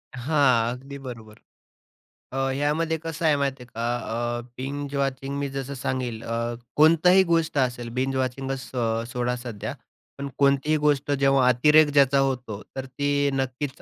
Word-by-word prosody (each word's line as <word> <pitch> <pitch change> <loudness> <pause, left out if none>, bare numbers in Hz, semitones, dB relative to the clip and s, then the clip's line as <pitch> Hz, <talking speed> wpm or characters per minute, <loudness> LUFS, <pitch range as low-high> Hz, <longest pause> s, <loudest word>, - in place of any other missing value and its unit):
हां, 125 -3 +2
अगदी 135 +3 -9
बरोबर. 115 -5 -10 0.9
अ, - - -3 0.2
यामध्ये 155 +3 0
कसं 165 0 -4
आहे 150 -2 +5
माहितीये 135 -2 -2
का? 120 +1 -2 0.4
अ, - - -5 0.2
बिंज 140 +2 -5
वॉचिंग 135 0 -2
मी 140 -1 -2
जसं 135 0 -5
सांगेल 125 -3 -3
अ, 115 +1 -2 0.2
कोणतीही 165 +5 +6
गोष्ट 165 -2 +1
असेल, 125 -3 0
बिंज 130 +2 -1
वॉचिंगच 130 +1 -2
सो 115 -3 -2
सोडा 125 +1 -2
सध्या, 120 -4 -6 0.4
पण 140 0 -4
कोणतीही 140 +2 +3
गोष्ट 145 -1 +1
जेव्हा 135 -2 +3
अतिरेक 150 +5 +5
ज्याचा 140 -1 +5
होतो, 125 -6 -1
तर 135 0 -4
ती 145 +2 0
नक्कीच 135 +1 -3
135 Hz, 150 wpm, -25 LUFS, 125-145 Hz, 0.9 s, कोणतीही